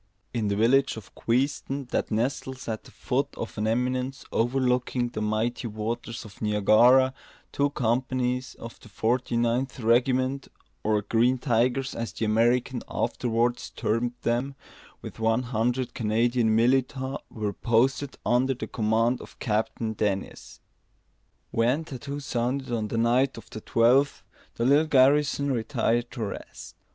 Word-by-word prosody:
In 115 -3 -1
the 100 - 0
village 125 +5 +3
of 105 - -11
Queenston, 135 +3 -1
that - - -1
nestles 130 +3 -2
at 110 -2 -4
the - - -13
foot - - -1
of - - -5
an 105 - 0
eminence 125 +3 -1
overlooking 125 0 +1
the 110 - -5
mighty 110 +3 -1
waters 115 +2 -4
of 100 - -14
Niagara, 115 +5 +5 0.4
two 145 0 +1
companies 125 0 -1
of 115 0 -10
the 115 - -15
Forty 120 +4 0
ninth 120 +3 0
Regiment, 130 +3 +2 0.4
or 105 -1 +1
"Green 120 +5 +2
Tigers," 125 +1 +1
as 115 0 -4
the 115 - -2
Americans 120 +3 +2
afterwards 120 0 -1
termed 120 +2 -1
them, 125 +4 0 0.5
with - - -9
one 115 +2 +2
hundred 120 +2 -1
Canadian 115 0 +1
militia, 130 +3 +1
were 105 -2 -3
posted 130 +6 +1
under 130 +2 +2
the - - -5
command 115 +2 +1
of - - -13
Captain 110 0 -1
Dennis. 100 -2 -3 0.9
When 125 +8 +1
tattoo 140 0 -6
sounded 130 0 -2
on 110 -2 -1
the 115 - -3
night 125 +3 +2
of 115 - -12
the 110 - -7
twelfth, 125 +7 +3 0.3
the 115 - -1
little 145 +4 +4
garrison 140 0 +3
retired 120 -1 0
to 120 - -4
rest. 100 - -7
120 Hz, 140 wpm, -26 LUFS, 115-130 Hz, 0.9 s, Niagara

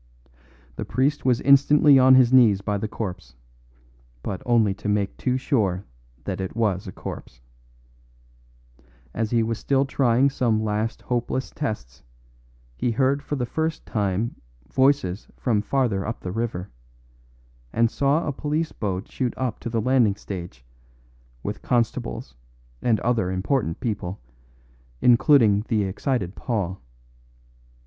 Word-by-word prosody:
The - - -3
priest 140 +3 0
was 125 -3 +2
instantly 140 +1 +6
on 130 0 +7
his 130 -1 +5
knees 110 -7 +6
by 100 0 -2
the 110 - -2
corpse; 95 - -6 0.9
but 95 - -4
only 115 -5 +3
to 100 +1 -5
make 100 -1 0
too 130 0 -1
sure 100 - 0 0.4
that 95 -1 -4
it 95 - -5
was 105 -4 0
a - - -5
corpse. - - -8 1.7
As 110 -1 -1
he 115 -1 +2
was 115 0 -2
still 135 0 +1
trying 135 0 +2
some 115 -5 +1
last 110 +2 -2
hopeless 125 +1 -2
tests 105 - -5 0.7
he 95 - -1
heard 135 +4 +1
for 145 - -4
the 125 -3 -1
first 160 +5 -3
time 105 +2 -1 0.4
voices 130 -8 +2
from 110 -5 +1
farther 110 -4 0
up 115 - -5
the 90 - -5
river, 110 -4 -3 1.0
and 115 +1 +2
saw 140 +4 +1
a 145 - -2
police 155 +3 -2
boat 95 -3 -3
shoot 125 -2 -3
up 130 -4 -2
to - - -5
the 115 -1 -1
landing 120 -4 +3
stage, 85 -12 -8 0.8
with 105 0 -4
constables 100 - -1 0.5
and 115 -3 +2
other 115 -6 +1
important 95 - -1
people, 100 -6 -3 0.8
including 120 -4 +5
the 110 -4 +1
excited 100 0 -2
Paul. 100 -7 -3
115 Hz, 135 wpm, -24 LUFS, 100-130 Hz, 1.7 s, on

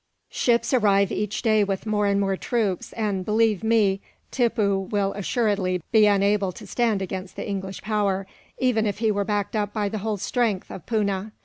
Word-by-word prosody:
Ships 235 +1 +1
arrive 200 -5 +3
each 210 +1 -2
day 215 -3 +4
with 195 0 -2
more 210 -1 +1
and 200 0 +2
more 195 -1 +1
troops 205 -3 -2
and, 205 -4 -1
believe 215 -1 +1
me, 210 -4 +2 0.3
Tippoo 210 -6 +1
will 200 -2 0
assuredly 200 -4 0
be 215 -2 +6
unable 200 -1 +2
to - - -11
stand 225 -5 0
against 185 0 -6
the - - -5
English 195 -1 -5
power, 200 -3 0 0.3
even 230 -4 +1
if 205 - -2
he 220 0 +1
were 205 -1 0
backed 205 +1 -1
up 205 -1 -1
by 210 -2 -1
the 215 - -4
whole 215 +1 -2
strength 210 -1 -1
of 180 - -9
Poona. 210 -2 -1
205 Hz, 185 wpm, -24 LUFS, 195-220 Hz, 0.3 s, be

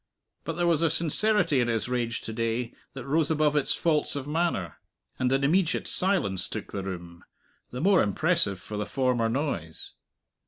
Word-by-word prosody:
But 165 - -2
there 175 +2 -1
was 165 -2 +2
a 165 - +3
sincerity 170 0 +2
in 120 - +2
his 115 -1 -1
rage 120 -2 -2
to 110 - -6
day 115 +1 -2 0.2
that 135 -3 -7
rose 150 +2 +1
above 155 -1 +2
its 145 - +2
faults 155 -4 0
of 140 -2 -4
manner; 150 - -1 0.4
and 130 0 +1
an 135 +1 +2
immediate 170 +4 +1
silence 180 - +2
took - - -6
the 100 - -3
room 85 -3 -7 0.5
the 125 - -6
more 190 +1 +5
impressive 105 - +2
for 105 - -7
the 105 0 -3
former 125 -4 +1
noise. 115 - -3
135 Hz, 180 wpm, -27 LUFS, 115-160 Hz, 0.5 s, more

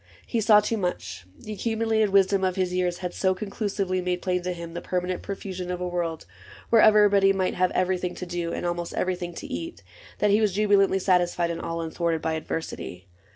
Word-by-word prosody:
He 230 - -1
saw 210 -1 +6
too 225 +2 -1
much: 105 - -4
The 215 - -8
accumulated 220 0 +1
wisdom 195 0 +3
of 185 -1 +1
his 185 -2 -1
years 180 -1 0
Had 180 - -3
so 190 -1 +1
conclusively 195 -2 -2
made 180 0 -2
plain 180 -1 0
to 180 +1 -3
him 170 -1 -7
The 175 - -5
permanent 180 0 -2
profusion 190 -2 -5
of 180 0 -3
a 180 - -2
world 170 -2 -3 0.5
Where 230 -2 +7
everybody 205 -2 +6
might 185 -1 0
have 185 0 +2
everything 180 -1 0
To 180 - -6
do, 175 -1 -3
and - - -3
almost 175 0 -3
everything 180 -2 -2
to - - -7
eat. 330 +4 -6 0.3
That 210 - +2
he 210 +2 +4
was 210 -3 +2
jubilantly 200 -1 +3
satisfied 175 -2 +1
And 165 - -4
all 165 0 -3
unthwarted 165 0 -1
by 160 0 0
adversity. 155 - -5
185 Hz, 200 wpm, -25 LUFS, 175-200 Hz, 0.5 s, Where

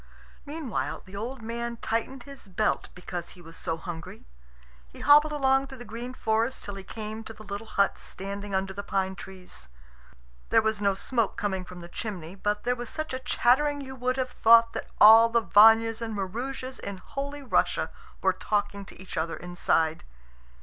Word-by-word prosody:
Meanwhile 290 -6 -3
the 190 - -12
old 235 +4 -5
man 235 +1 -4
tightened 230 +4 -2
his 275 -6 -12
belt, 210 +3 0
because 180 -1 -6
he 180 - -14
was 165 0 -12
so 165 -2 -3
hungry. 165 - -8 0.6
He - - -13
hobbled 300 +1 +6
along 270 -2 +2
through 265 - -10
the 245 - -9
green 240 +3 -7
forest 225 +3 0
till 205 - -6
he 195 0 -8
came 220 +2 -6
to 225 - -9
the 215 - -13
little 205 +1 -6
hut 200 -2 +1
standing 200 +1 -6
under 190 0 -1
the 200 - -4
pine 190 -1 -1
trees. 180 - -10 0.8
There - - +4
was 220 -1 0
no 200 -1 +2
smoke 230 +1 -1
coming 200 -4 -1
from 180 -1 -10
the 170 - -9
chimney, 180 -4 -6
but 205 +2 -2
there 245 +1 +1
was 240 -1 -6
such 310 -3 -4
a 260 - -2
chattering 265 +3 +2
you 265 -1 -7
would 255 0 -1
have 255 -1 -1
thought 230 0 +6
that - - -5
all 225 +2 +9
the 230 0 +2
Vanyas 225 +2 +6
and 225 -2 -3
Maroosias 255 +7 -4
in 200 -1 -6
Holy 280 +7 -6
Russia 260 - +1 0.3
were - - +4
talking 205 -1 -1
to - - -14
each 185 -2 -8
other 165 +1 -1
inside. 165 -2 0
220 Hz, 185 wpm, -27 LUFS, 190-250 Hz, 0.8 s, all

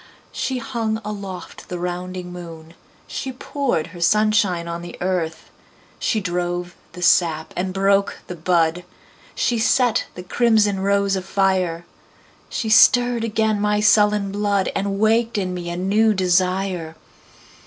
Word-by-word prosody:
She 260 - -2
hung 230 -3 -2
aloft 200 -4 -7
the 180 - -4
rounding 180 0 -5
moon, 165 -2 -10 0.3
She 265 - -5
poured 255 - -2
her 175 - -9
sunshine 205 -3 +2
on 170 0 -4
the 175 0 -9
earth, 175 -3 -3 0.5
She 220 - 0
drove 175 -1 -3 0.2
the 180 +1 -7
sap 165 -2 +2
and 185 +1 -2
broke 195 +1 +1
the 180 - -7
bud, 170 0 +1 0.5
She 240 -2 0
set 240 +1 +2
the 180 - -7
crimson 210 -1 +2
rose 200 0 +1
afire. 185 -3 0 0.6
She 225 - -3
stirred 240 +2 +5
again 220 -2 0
my 210 0 +1
sullen 210 -1 +3
blood, 200 -1 0
And 195 0 -1
waked 225 +2 +2
in 185 -2 -2
me 175 -1 -5
a 170 - -4
new 210 +4 +2
desire. 185 -2 0
195 Hz, 135 wpm, -21 LUFS, 175-215 Hz, 0.6 s, stirred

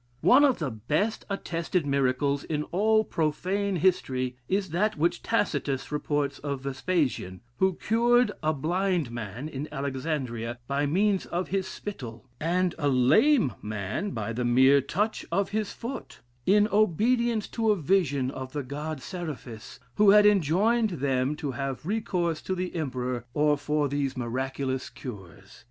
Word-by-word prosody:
One 270 +4 +6
of 275 -4 +4
the 150 -6 -2
best 150 - -1
attested 170 -3 -2
miracles 140 0 +1
in 150 -2 -2
all 215 +4 +3
profane 190 +5 -1
history, 130 -8 +1
is 190 -3 0
that 210 +4 +1
which 170 +3 +1
Tacitus 145 - -1
reports 145 -2 -1
of 140 -2 -4
Vespasian, 135 - -1 0.2
who 190 +2 +2
cured 240 +2 +3
a 155 0 +2
blind 170 -1 0
man 120 +3 -5
in 150 0 -6
Alexandria 130 -4 -3
by 140 +1 0
means 195 +5 +1
of 175 +2 -3
his 195 0 -1
spittle, 120 - -7
and 180 +2 +1
a 145 - +1
lame 140 - +4
man 105 - -3
by 115 - -4
the 125 +2 -2
mere 130 +3 +5
touch 210 - -1
of 200 0 +1
his 215 0 -2
foot; 245 +3 -7 0.3
in 210 +2 +5
obedience 220 +3 +2
to 225 -2 0
a 210 - +5
vision 145 -7 +1
of 130 -1 -7
the 145 -1 -2
god 145 +1 -5
Seraphis, 150 - -7 0.2
who 210 -1 +6
had 210 +1 +7
enjoined 210 +5 +3
them 135 +1 0
to 150 -2 -4
have 135 +2 -4
recourse 175 -5 -1
to 190 - -2
the 180 0 -3
emperor 125 -6 -3 0.3
for 145 +1 0
these 140 -1 -2
miraculous 130 +2 -2
cures. 95 -5 -10
150 Hz, 145 wpm, -27 LUFS, 130-195 Hz, 0.3 s, had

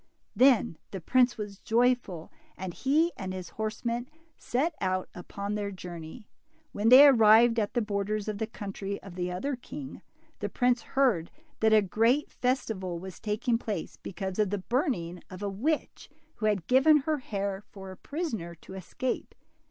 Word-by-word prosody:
Then 250 - +4
the 195 - -6
prince 250 +7 +3
was 205 -2 -6
joyful, 235 -8 +1 0.3
and 185 -1 -5
he 310 - +2
and 190 -2 -5
his 185 -2 -7
horse 220 +2 -5
men 235 +2 -2 0.3
set 290 +8 -1
out 185 -1 0
upon 200 +3 -5
their 205 -1 -2
journey. 180 +2 -9 0.4
When 210 +2 +1
they 260 +4 +10
arrived 230 -2 +6
at 210 +3 -2
the 240 - +2
borders 210 0 -2
of 210 -1 -3
the 220 - -1
country 200 -2 -5
of 195 - -10
the 180 0 -3
other 270 +10 -2
king, 265 +2 -9 0.4
the - - -3
prince 245 -1 +2
heard 235 -13 +1 0.3
that 220 0 +3
a 215 -1 +6
great 230 +9 +2
festival 220 -8 -2
was 185 0 -9
taking 225 +2 0
place 205 -8 -4
because 190 +1 -5
of 210 -2 +3
the 205 - -1
burning 200 - -1
of 185 +1 -8
a - - -1
DIMPLE. 200 - -2
61 - - -11
witch, 310 +2 -1 0.3
who 215 - 0
had 200 -6 0
given 270 +6 +6
her 305 +1 -1
hair 200 -4 -3
for 195 -1 -9
a - - -9
prisoner 225 - -4
to 180 - -13
escape. 190 +7 -4
215 Hz, 175 wpm, -29 LUFS, 190-250 Hz, 0.4 s, they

